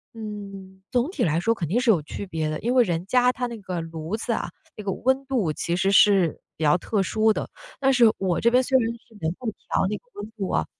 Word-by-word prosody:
嗯， 200 -3 -8
总 250 +5 +1
体 305 -10 -2
来 160 0 +2
说 225 +5 +2
肯 170 -8 -4
定 220 +8 +2
是 250 -2 +1
有 180 -8 +5
区 190 +6 -7
别 160 -3 -2
的， 155 - -3
因 240 +2 -1
为 255 -1 +6
人 175 -4 -2
家 250 +4 +3
他 250 0 -3
那 235 -1 -7
个 185 -3 -4
炉 165 +4 -5
子 235 - -2
啊， - - -2 0.3
那 210 - -8
个 195 - -1
温 265 +7 0
度 230 - 0
其 170 - -3
实 195 - +2
是 200 -5 +4 0.2
比 160 - -4
较 150 +4 +5
特 205 +3 -1
殊 220 +3 +2
的， - - -3 0.3
但 270 -1 +3
是 235 -3 +6
我 185 -3 0
这 235 - +4
边 250 +1 +5
虽 260 +1 +3
然 230 -2 +1
是 235 -1 -14
能 160 0 0
够 250 - -8
调 200 - -2
那 210 - -2
个 - - -10
温 205 +1 -7
度 200 -4 -4
啊， - - +1
210 Hz, 280 characters per minute, -24 LUFS, 180-240 Hz, 0.3 s, 为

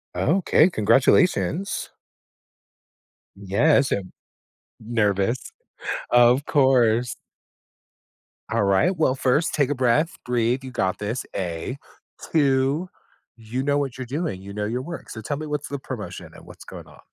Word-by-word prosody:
Okay, 175 0 +3
congratulations. 170 - +2 1.4
Yes, 115 +9 +2
and 95 -2 -2 0.7
nervous, 110 0 0 0.7
of 120 +3 +5
course. 125 -4 +3 1.4
Alright, 115 - +2
well, 145 -5 +2
1st 135 +5 +1
take 140 -3 +2
a 145 - 0
breath, 130 +6 +1
breathe, 120 +1 0
you 130 - -8
got 95 -6 -1
this, 110 +4 -3
A. 90 +6 -4 0.6
2, 140 +3 +2 0.5
you 115 +3 -4
know 145 +1 +1
what 135 -3 -2
you're 130 - -5
doing, 135 - -3
you 100 +1 -9
know 105 0 -3
your 120 +4 -2
work, 170 +5 -8
so 110 - -7
tell 145 +6 -3
me 155 +1 -6
what's 150 -1 -4
the 140 - -4
promotion 130 -5 -7
and - - -14
what's - - -13
going - - -10
on. - - -17
130 Hz, 135 wpm, -23 LUFS, 110-145 Hz, 1.4 s, of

